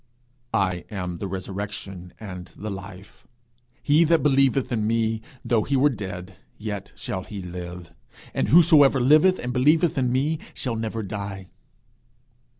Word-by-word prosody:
'I 95 -3 0
am 90 -4 -4
the 100 - -3
resurrection, 95 -1 -6
and 90 -4 -8
the 105 +1 -5
life: 95 0 -10 0.6
he 150 +3 +5
that 165 0 +3
believeth 135 -2 +3
in 110 -3 0
me, 110 -1 0 0.2
though 115 -2 +2
he 140 +6 -1
were 140 +2 +4
dead, 95 -4 -7 0.2
yet 105 -2 -5
shall 110 -8 -4
he 105 0 -8
live. 90 -1 -8 0.4
And - - 0
whosoever 150 -4 +6
liveth, 155 +9 +5
and 125 0 -4
believeth 150 +4 +3
in 125 -2 +1
me, 145 +5 +1 0.2
shall 125 -3 -3
never 110 0 -3
die.' 100 -2 -6
110 Hz, 145 wpm, -24 LUFS, 95-135 Hz, 0.6 s, whosoever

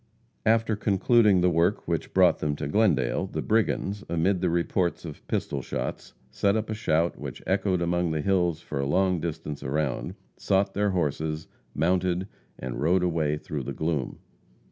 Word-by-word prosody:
After 110 -1 +3
concluding 105 0 +3
the 90 - +4
work 85 +5 +1
which 85 -2 -2
brought - - +4
them 75 -1 -1
to 70 - -4
Glendale, 85 - +2
the - - -4
brigands, 105 -2 0
amid 85 +3 +1
the 90 - +2
reports 85 +1 0
of 75 -3 -9
pistol - - -2
shots, - - -5 0.2
set 100 +10 +1
up 110 0 -2
a - - 0
shout 85 -6 0
which - - -7
echoed 95 -2 +1
among 85 0 +1
the 80 -1 -1
hills 90 -3 +1
for 70 - -5
a 70 - 0
long 90 +3 +2
distance 80 -2 -5
around, 70 -1 -2 0.2
sought 95 0 +1
their 105 +1 +1
horses, 80 -3 -1 0.3
mounted, 90 +3 +1 0.3
and 65 0 -5
rode 90 +4 +3
away 80 -4 0
through 75 -1 -5
the 65 - -5
gloom. 80 -5 -2
85 Hz, 165 wpm, -26 LUFS, 80-95 Hz, 0.3 s, the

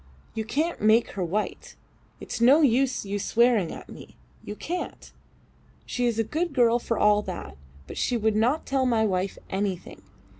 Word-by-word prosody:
You 220 - -3
can't 310 +9 -1
make 220 +2 +4
her 195 - -3
white. 200 +5 -3 0.4
It's - - -6
no 270 +7 +6
use 260 -2 +2
you 200 +1 -3
swearing 230 -4 +2
at - - -9
me. - - -12 0.3
You 210 - -6
can't. 355 +10 -6 0.7
She 245 0 -1
is 235 -2 -1
a 225 - +2
good 320 +8 -2
girl 240 -2 +4
for 230 -1 -2
all 210 0 +4
that, 180 - -7 0.3
but - - -7
she 245 - +1
would 220 -1 +1
not 245 +8 +1
tell 270 -1 +1
my 225 -3 +2
wife 190 -1 -1
anything. 190 -2 -3
225 Hz, 175 wpm, -26 LUFS, 205-250 Hz, 0.7 s, no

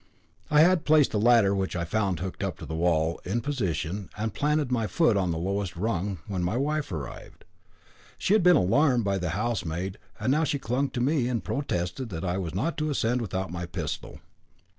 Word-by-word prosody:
I 150 0 +6
had 175 0 +4
placed 150 -3 +4
the 105 - 0
ladder, 115 -3 +5
which 95 -2 -1
I 85 -1 -1
found 95 0 -1
hooked 95 0 -4
up - - -2
to - - -8
the - - -6
wall, 80 -1 +1
in 105 +6 -1
position, 100 - -2
and 110 +1 -2
planted 150 -2 0
my 115 -3 +1
foot 160 -7 +3
on 95 -3 +1
the 80 - -1
lowest 95 +2 -2
rung, 95 0 -1
when 95 -3 -3
my 90 +7 0
wife 150 -2 -1
arrived. 75 -7 -7 0.7
She 195 - +1
had 215 - +5
been 180 0 +6
alarmed 125 - +3
by 100 -1 0
the 90 -1 -2
housemaid, 95 -5 -2 0.2
and 110 +4 +1
now 155 +3 +3
she 150 -1 0
clung 135 +2 -1
to 120 - -3
me, 135 -1 +2
and 120 -6 -1
protested 115 0 -2
that 90 -1 -5
I 90 +1 -1
was 85 -2 -4
not 160 - -1
to 155 0 0
ascend 125 -3 0
without 95 -4 -3
my 85 0 -4
pistol. 85 - -5
105 Hz, 205 wpm, -27 LUFS, 90-135 Hz, 0.7 s, I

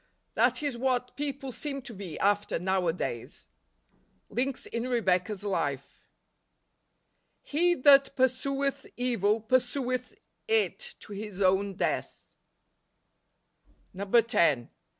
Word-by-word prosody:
That - - +2
is 275 -5 -2
what 250 -1 0
people 280 -2 -4
seem 275 +1 -4
to 240 - -9
be 185 -5 -7
after 205 +1 +1
nowadays. 175 -9 -2 0.8
Links 255 +4 -2
in 235 +2 -3
Rebecca's 200 -4 0
Life. 145 -9 -2 0.7
" - - -48
He 350 +3 +4
that 275 0 +6
pursueth 275 +2 0
evil 230 -3 +1
pursueth 250 +2 0 0.3
it 450 +2 0
to 210 - -10
his 205 -1 -7
own 195 +1 +2
death." - - -2 1.7
NOVEMBER. 200 +4 +1
127 160 - +2
10. - - -41
235 Hz, 110 wpm, -29 LUFS, 195-270 Hz, 1.7 s, that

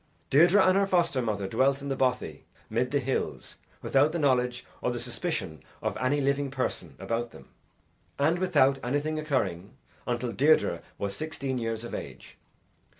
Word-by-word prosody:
Deirdre 175 +8 +6
and 185 - +5
her 200 0 +3
foster 170 -8 +2
mother 105 -4 -2
dwelt 135 +6 +2
in 140 - -7
the 135 - 0
bothy 125 - -1 0.3
mid 120 +3 +1
the 145 - +1
hills 135 -1 -3 0.3
without 140 +3 +3
the - - 0
knowledge 125 -5 +1 0.2
or - - 0
the 120 - -3
suspicion 120 - -3 0.2
of - - -2
any 130 +3 +1
living 140 0 +1
person 130 -1 -3
about 115 +1 -2
them - - -15 0.7
and 155 +5 +2
without 145 -7 +3
anything 145 +5 -1
occurring, 105 - -2 0.3
until 120 0 -1
Deirdre 150 +6 +3 0.2
was 100 -1 -3
sixteen 140 -4 -3
years 115 -1 -3
of 120 - -7
age. - - -8
135 Hz, 160 wpm, -28 LUFS, 120-145 Hz, 0.7 s, Deirdre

